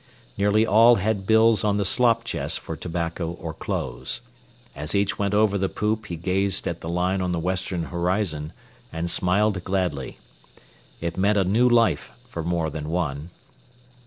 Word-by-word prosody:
Nearly 105 Hz, +2 st, +3 dB
all 115 Hz, +3 st, +6 dB
had 100 Hz, -1 st, -1 dB
bills 110 Hz, -2 st, +4 dB
on 105 Hz, -1 st, +1 dB
the 100 Hz, -, 0 dB
slop 115 Hz, +2 st, +3 dB
chest 115 Hz, -, -2 dB
for -, -, -6 dB
tobacco 85 Hz, 0 st, -3 dB
or 85 Hz, -2 st, -7 dB
clothes. -, -, -3 dB, 0.5 s
As 75 Hz, +6 st, -4 dB
each 100 Hz, 0 st, 0 dB
went 100 Hz, 0 st, 0 dB
over 105 Hz, -1 st, +3 dB
the 95 Hz, 0 st, 0 dB
poop 105 Hz, +1 st, -2 dB
he 85 Hz, -, -4 dB
gazed 95 Hz, +3 st, 0 dB
at 85 Hz, 0 st, -4 dB
the 80 Hz, -, -5 dB
line 90 Hz, +2 st, 0 dB
on 90 Hz, -1 st, -1 dB
the 85 Hz, -, -1 dB
western 90 Hz, 0 st, -2 dB
horizon 85 Hz, -3 st, -1 dB, 0.4 s
and 85 Hz, +1 st, -2 dB
smiled 95 Hz, +1 st, +1 dB
gladly. 90 Hz, -8 st, -2 dB, 0.8 s
It 85 Hz, 0 st, -3 dB
meant 100 Hz, +2 st, +2 dB
a 100 Hz, -, +4 dB
new 110 Hz, +7 st, +3 dB
life 115 Hz, -1 st, +2 dB, 0.2 s
for 85 Hz, -, -5 dB
more 85 Hz, -2 st, -1 dB
than 75 Hz, +1 st, -5 dB
one. 80 Hz, -2 st, -2 dB
95 Hz, 165 wpm, -24 LUFS, 85-105 Hz, 0.8 s, all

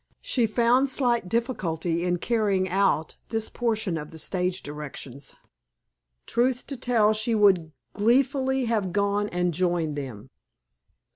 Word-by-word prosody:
She 240 Hz, -3 st, +1 dB
found 245 Hz, +5 st, +3 dB
slight 240 Hz, -7 st, +1 dB
difficulty 175 Hz, -8 st, -1 dB
in 180 Hz, 0 st, +1 dB
carrying 200 Hz, -2 st, +1 dB
out 190 Hz, -4 st, +1 dB
this 225 Hz, -1 st, -1 dB
portion 220 Hz, -8 st, -1 dB
of 150 Hz, 0 st, -8 dB
the 160 Hz, -, -11 dB
stage 180 Hz, +3 st, -2 dB
directions. 145 Hz, -2 st, -7 dB, 0.9 s
Truth 250 Hz, +1 st, 0 dB
to -, -, -4 dB
tell, 235 Hz, -4 st, +2 dB
she 215 Hz, +2 st, 0 dB
would 190 Hz, -7 st, +4 dB, 0.2 s
gleefully 265 Hz, +4 st, +2 dB
have 210 Hz, -6 st, -1 dB
gone 205 Hz, +1 st, +1 dB
and 180 Hz, 0 st, 0 dB
joined 170 Hz, -3 st, 0 dB
them. 130 Hz, -8 st, -7 dB
200 Hz, 130 wpm, -26 LUFS, 170-235 Hz, 0.9 s, would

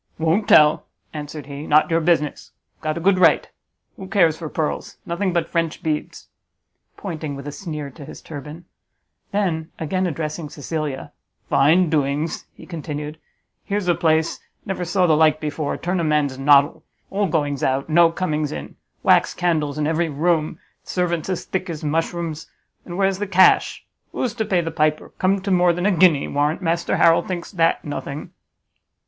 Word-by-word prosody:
"Won't 165 Hz, +6 st, +1 dB
tell!" 150 Hz, 0 st, +5 dB, 0.3 s
answered 150 Hz, -1 st, -7 dB
he; 140 Hz, +2 st, -7 dB
"not 155 Hz, +2 st, +4 dB
your 165 Hz, 0 st, +3 dB
business. 155 Hz, -3 st, 0 dB, 0.3 s
Got 155 Hz, +1 st, -2 dB
a -, -, -2 dB
good 185 Hz, +2 st, +3 dB
right. 170 Hz, -3 st, +4 dB, 0.5 s
Who 190 Hz, -3 st, -8 dB
cares 175 Hz, -6 st, +3 dB
for 160 Hz, -2 st, -7 dB
pearls? 155 Hz, -1 st, -3 dB
Nothing 180 Hz, +3 st, -1 dB
but 170 Hz, -2 st, 0 dB
French 165 Hz, 0 st, -2 dB
beads." 155 Hz, -2 st, -3 dB, 0.7 s
Pointing 155 Hz, -6 st, -5 dB
with 140 Hz, +1 st, -8 dB
a -, -, -4 dB
sneer 150 Hz, -3 st, -6 dB
to 140 Hz, -, -12 dB
his -, -, -10 dB
turban. 150 Hz, +2 st, -9 dB, 0.7 s
Then, 175 Hz, -6 st, -1 dB
again 185 Hz, +4 st, -1 dB
addressing 155 Hz, -1 st, -4 dB
Cecilia, 150 Hz, -1 st, -4 dB, 0.4 s
"Fine 160 Hz, +5 st, +4 dB
doings!" 150 Hz, +1 st, -1 dB
he -, -, -13 dB
continued, 150 Hz, -2 st, -6 dB, 0.4 s
"Here's 205 Hz, -2 st, -2 dB
a 175 Hz, -, +4 dB
place! 160 Hz, -1 st, +1 dB, 0.3 s
never 190 Hz, -2 st, -3 dB
saw 180 Hz, +1 st, +2 dB
the 160 Hz, -3 st, +4 dB
like 155 Hz, 0 st, +4 dB
before! 150 Hz, -1 st, -3 dB
turn 180 Hz, +1 st, -2 dB
a -, -, 0 dB
man's 150 Hz, -4 st, 0 dB
noddle! 145 Hz, +3 st, +4 dB, 0.3 s
All 200 Hz, 0 st, +1 dB
goings 145 Hz, -4 st, -1 dB
out; 135 Hz, +1 st, 0 dB
no 165 Hz, +1 st, +5 dB
comings 155 Hz, -4 st, -2 dB
in; -, -, -7 dB, 0.3 s
wax -, -, +4 dB
candles 155 Hz, -5 st, 0 dB
in 150 Hz, -, 0 dB
every 165 Hz, +2 st, 0 dB
room; 155 Hz, +1 st, 0 dB, 0.3 s
servants 180 Hz, 0 st, -2 dB
thick 185 Hz, -1 st, -3 dB
as 160 Hz, -2 st, -5 dB
mushrooms! 160 Hz, +1 st, -2 dB, 0.4 s
And 175 Hz, 0 st, -7 dB
where's 195 Hz, -1 st, +1 dB
the 205 Hz, -, -2 dB
cash? 190 Hz, 0 st, +4 dB, 0.3 s
Who's 245 Hz, -4 st, -2 dB
to 220 Hz, -1 st, -2 dB
pay 180 Hz, -4 st, +1 dB
the 165 Hz, -1 st, -4 dB
piper? 155 Hz, 0 st, 0 dB
Come 190 Hz, +1 st, +2 dB
to 195 Hz, +1 st, -2 dB
more 180 Hz, -1 st, +4 dB
than 175 Hz, +2 st, -3 dB
a 205 Hz, -, +4 dB
guinea; 170 Hz, -5 st, +4 dB
warrant 150 Hz, +5 st, 0 dB
Master 170 Hz, 0 st, 0 dB
Harrel 165 Hz, 0 st, +5 dB
thinks 180 Hz, -2 st, -5 dB
that 165 Hz, -4 st, +1 dB
nothing!" 145 Hz, 0 st, -6 dB
160 Hz, 170 wpm, -21 LUFS, 150-180 Hz, 0.7 s, tell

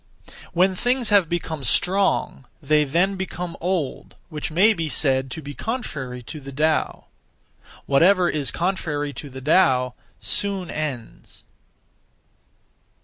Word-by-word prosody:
When 185 Hz, +2 st, +3 dB
things 245 Hz, +5 st, +1 dB
have 200 Hz, -6 st, +4 dB
become 160 Hz, -4 st, -3 dB
strong, 190 Hz, -5 st, +1 dB
they 150 Hz, 0 st, +2 dB
(then) 180 Hz, +7 st, +1 dB
become 180 Hz, -2 st, -5 dB
old, 175 Hz, -5 st, -2 dB
which 150 Hz, -1 st, -4 dB
may 190 Hz, +8 st, +4 dB
be 165 Hz, -5 st, -3 dB
said 135 Hz, -1 st, +1 dB
to 155 Hz, +5 st, -6 dB
be 145 Hz, +1 st, -7 dB
contrary 140 Hz, -, -4 dB
to 155 Hz, +6 st, -8 dB
the 140 Hz, -1 st, -9 dB
Tao. 155 Hz, +3 st, 0 dB, 0.8 s
Whatever 180 Hz, +6 st, +4 dB
is 150 Hz, -5 st, -1 dB
contrary 155 Hz, -5 st, -2 dB
to 145 Hz, +3 st, -7 dB
the 130 Hz, 0 st, -9 dB
Tao 130 Hz, -5 st, +3 dB, 0.3 s
soon 195 Hz, -3 st, -1 dB
ends. 140 Hz, -7 st, -6 dB
160 Hz, 125 wpm, -23 LUFS, 140-185 Hz, 0.8 s, have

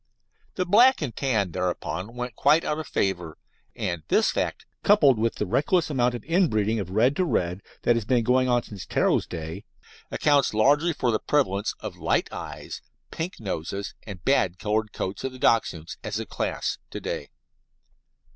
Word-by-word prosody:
The 185 Hz, -, 0 dB
black 235 Hz, +3 st, +5 dB
and 120 Hz, -6 st, -4 dB
tan 110 Hz, -9 st, 0 dB
thereupon 90 Hz, +4 st, -3 dB
went 125 Hz, -2 st, -5 dB
quite 150 Hz, +6 st, +4 dB
out 150 Hz, -, -1 dB
of 155 Hz, -, -6 dB
favour, 90 Hz, -5 st, -1 dB, 0.4 s
and 85 Hz, -2 st, -2 dB
this -, -, +3 dB
fact, -, -, -2 dB, 0.2 s
coupled 145 Hz, -, +5 dB
with 115 Hz, +1 st, +1 dB
the -, -, -2 dB
reckless 155 Hz, -, +1 dB
amount 125 Hz, -3 st, +1 dB
of 120 Hz, -, -7 dB
inbreeding 115 Hz, -, +1 dB
of 95 Hz, -3 st, -4 dB
red 115 Hz, +8 st, +3 dB
to 185 Hz, -, +3 dB
red 90 Hz, -, -1 dB, 0.2 s
that 120 Hz, -, +4 dB
has 115 Hz, -, -1 dB
been 120 Hz, +2 st, +2 dB
going 130 Hz, +2 st, +3 dB
on 120 Hz, -1 st, +2 dB
since 100 Hz, -4 st, -9 dB
Ptero's -, -, +1 dB
day, 80 Hz, -2 st, -6 dB, 0.5 s
accounts 145 Hz, -6 st, +2 dB
largely 145 Hz, +10 st, +4 dB
for 125 Hz, -6 st, 0 dB
the 110 Hz, -, +1 dB
prevalence 105 Hz, -9 st, 0 dB
of -, -, -6 dB
light -, -, 0 dB
eyes, -, -, -7 dB, 0.3 s
pink 165 Hz, +3 st, -5 dB
noses, 100 Hz, -1 st, -4 dB
and 95 Hz, -5 st, -10 dB
bad 95 Hz, -10 st, +2 dB
coloured 110 Hz, +1 st, -1 dB
coats 95 Hz, +5 st, -4 dB
of 130 Hz, -1 st, -3 dB
the -, -, -9 dB
Dachshunds, 85 Hz, -10 st, +1 dB
as 105 Hz, 0 st, -3 dB
a 115 Hz, -, -4 dB
class, -, -, -3 dB
to -, -, -6 dB
day. -, -, -4 dB
115 Hz, 175 wpm, -25 LUFS, 100-140 Hz, 0.5 s, black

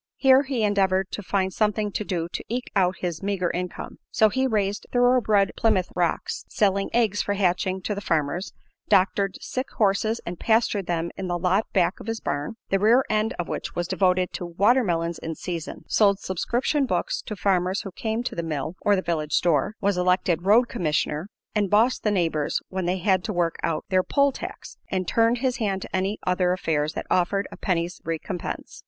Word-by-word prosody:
Here 265 Hz, 0 st, +5 dB
he 265 Hz, -5 st, -2 dB
endeavored 195 Hz, -2 st, +2 dB
to -, -, -4 dB
find 190 Hz, -1 st, -1 dB
something 210 Hz, 0 st, 0 dB
to 210 Hz, -, -2 dB
do 175 Hz, -5 st, -2 dB
to -, -, -4 dB
eke 245 Hz, +2 st, -3 dB
out 185 Hz, -1 st, +3 dB
his 175 Hz, -3 st, -3 dB
meagre 195 Hz, -3 st, -1 dB
income; 180 Hz, 0 st, -5 dB
so 220 Hz, -, +4 dB
he 260 Hz, +4 st, +1 dB
raised 205 Hz, -4 st, -1 dB
"thoroughbred 245 Hz, -5 st, +3 dB
Plymouth 195 Hz, -5 st, +1 dB
Rocks," 175 Hz, -2 st, -1 dB
selling 200 Hz, -1 st, +1 dB
eggs 220 Hz, -4 st, +2 dB
for 205 Hz, -, -1 dB
hatching 185 Hz, -1 st, 0 dB
to 210 Hz, -, -1 dB
the 200 Hz, -, -5 dB
farmers; 165 Hz, +1 st, -1 dB, 0.4 s
doctored 195 Hz, 0 st, +2 dB
sick 255 Hz, +1 st, -4 dB
horses 215 Hz, +2 st, +2 dB
and 175 Hz, 0 st, -6 dB
pastured 220 Hz, -4 st, +1 dB
them 170 Hz, -1 st, -1 dB
in 190 Hz, -, -4 dB
the 175 Hz, -1 st, -1 dB
lot 185 Hz, +5 st, +1 dB
back 185 Hz, -1 st, +1 dB
of -, -, -10 dB
his 225 Hz, 0 st, -2 dB
barn, 145 Hz, +8 st, -3 dB, 0.2 s
the 195 Hz, -, +3 dB
rear 235 Hz, +6 st, +4 dB
end 215 Hz, +1 st, +1 dB
of 175 Hz, -, -3 dB
which -, -, -5 dB
was 175 Hz, 0 st, -1 dB
devoted 185 Hz, -1 st, +1 dB
to -, -, -4 dB
"watermelons 175 Hz, -3 st, +1 dB
in 165 Hz, 0 st, -5 dB
season"; 170 Hz, -2 st, -6 dB
sold 200 Hz, -2 st, +4 dB
subscription 245 Hz, -, -1 dB
books -, -, -1 dB
to 215 Hz, -, -6 dB
farmers 190 Hz, -1 st, +1 dB
who 195 Hz, -, -7 dB
came 220 Hz, +5 st, -2 dB
to -, -, -3 dB
the 170 Hz, -, -2 dB
mill 155 Hz, 0 st, -3 dB
or 205 Hz, -, +3 dB
the 190 Hz, -, -1 dB
village 155 Hz, -3 st, -2 dB
store; 170 Hz, +3 st, +2 dB
was 200 Hz, -2 st, +1 dB
elected 180 Hz, -1 st, +1 dB
"road 235 Hz, +4 st, +6 dB
commissioner" 155 Hz, -4 st, -1 dB, 0.3 s
and 205 Hz, -3 st, +1 dB
bossed 225 Hz, +6 st, +3 dB
the 215 Hz, -, +1 dB
neighbors 165 Hz, -7 st, 0 dB
when 190 Hz, -1 st, -3 dB
they 180 Hz, +1 st, +1 dB
had 185 Hz, 0 st, +2 dB
to 220 Hz, -, -3 dB
work 175 Hz, -3 st, 0 dB
out 165 Hz, -2 st, -1 dB
their 185 Hz, -1 st, +3 dB
poll 280 Hz, +8 st, +2 dB
tax, -, -, -8 dB
and 185 Hz, -2 st, -2 dB
turned 230 Hz, +1 st, +3 dB
his 255 Hz, 0 st, 0 dB
hand 200 Hz, -5 st, -1 dB
to -, -, -6 dB
any 190 Hz, +3 st, 0 dB
other 180 Hz, 0 st, +2 dB
affairs 155 Hz, -4 st, -1 dB
that -, -, -4 dB
offered 195 Hz, +3 st, +1 dB
a -, -, -8 dB
penny's 175 Hz, -1 st, -2 dB
recompense. 165 Hz, +2 st, -5 dB
195 Hz, 195 wpm, -25 LUFS, 175-215 Hz, 0.4 s, road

